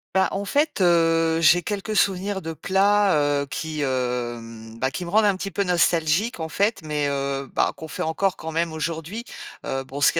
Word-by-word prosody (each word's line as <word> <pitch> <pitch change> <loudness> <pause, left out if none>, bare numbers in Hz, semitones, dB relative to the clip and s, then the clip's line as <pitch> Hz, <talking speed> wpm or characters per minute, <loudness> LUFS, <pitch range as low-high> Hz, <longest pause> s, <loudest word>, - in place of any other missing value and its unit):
Bah 190 0 +3
en 200 +1 -3
fait, 295 +6 0
heu, 165 -2 +3
j'ai 175 +3 +6
quelques 205 +3 -3
souvenirs 195 0 +1
de 165 -1 -5
plats, 190 -6 +2
heu, - - -3
qui, 155 +1 -4
hem, 120 -4 -3
bah, 130 - +1
me 175 - -5
rendent 215 +3 +4
un 200 -2 +3
petit 195 +1 -5
peu 200 - 0
nostalgique, 175 +4 +2
en 160 - -3
fait, 200 +7 0
mais, 150 -1 -1
heu, 140 -1 -2
bah, - - +1
qu'on 160 - -9
fait - - -5
encore 185 +4 0
quand 160 0 -6
même 165 +1 0
aujourd'hui. 165 +8 -4 0.4
Heu, 135 0 -2
bon, 135 +2 -8
ce 145 - +4
qu'il 165 - +1
165 Hz, 200 wpm, -23 LUFS, 145-195 Hz, 0.4 s, j'ai